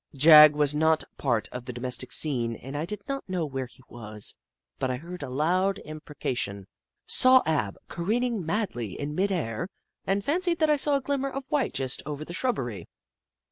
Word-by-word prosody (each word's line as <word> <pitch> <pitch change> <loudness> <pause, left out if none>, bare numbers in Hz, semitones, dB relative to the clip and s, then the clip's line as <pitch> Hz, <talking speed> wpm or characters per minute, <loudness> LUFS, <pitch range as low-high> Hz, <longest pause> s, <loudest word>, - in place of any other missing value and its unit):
Jagg 150 0 +9
was 150 -1 +2
not 160 +1 +3
a - - -18
part 115 -6 0
of 125 -1 -7
the 125 - -6
domestic 125 0 -4
scene 120 -7 +1
and 135 +5 -9
I 150 +2 -2
did 210 +4 -6
not 275 -6 -4
know 180 -3 -1
where 135 -3 -4
he 130 - -20
was, 110 -3 -3 0.4
but 130 - -1
I 130 - -1
heard 175 +5 -9
a 140 - -5
loud 180 +8 +1
im 155 0 -8
precation, 120 -10 -4 0.4
saw 255 0 +5
Ab 140 -11 0
careening 225 +4 -1
madly 160 - -3
in 145 +1 -4
midair, 175 - -1 0.4
and 195 +1 0
fancied 345 +3 +1
that 315 -1 +3
I 300 - +3
saw 290 +1 +4
a 275 - 0
glimmer 275 0 -1
of 275 0 -6
white 285 -6 0
just 130 -2 -2
over 150 0 -5
the 170 - -8
shrubbery. 125 - -2
155 Hz, 190 wpm, -27 LUFS, 125-205 Hz, 0.4 s, Jagg